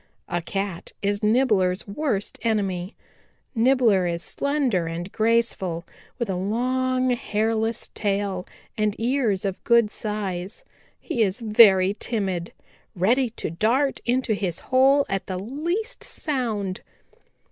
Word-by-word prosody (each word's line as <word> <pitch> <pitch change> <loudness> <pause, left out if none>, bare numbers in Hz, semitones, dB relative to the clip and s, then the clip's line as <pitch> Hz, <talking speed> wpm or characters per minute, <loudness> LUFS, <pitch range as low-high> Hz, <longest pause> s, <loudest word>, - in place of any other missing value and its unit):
A 175 0 -1
Cat 195 0 -4
is 205 0 0
Nibbler's 210 -5 +2
worst 205 -2 -2
enemy. 195 -4 -1 0.6
Nibbler 230 -6 +3
is 170 0 -2
slender 270 - 0
and 170 +3 -5
graceful, 215 -7 0 0.3
with 235 - -2
a 190 - -1
long, 255 +6 0
hairless 225 -1 -1
tail 200 -3 -1 0.3
and 215 -2 0
ears 230 -5 +1
of 195 -1 -3
good 235 -3 +4
size. 205 - -4 0.4
He 250 -9 -2
is 200 +1 +1
very 210 -4 +6
timid, 190 -7 -2 0.4
ready 235 +8 +2
to 220 - -5
dart 245 - +1
into 245 -1 +1
his 185 -5 -2 0.2
hole 275 +2 +5
at 195 -1 -3
the 185 - -3
least 335 - -3
sound. 220 -9 -3
215 Hz, 120 wpm, -24 LUFS, 190-245 Hz, 0.6 s, very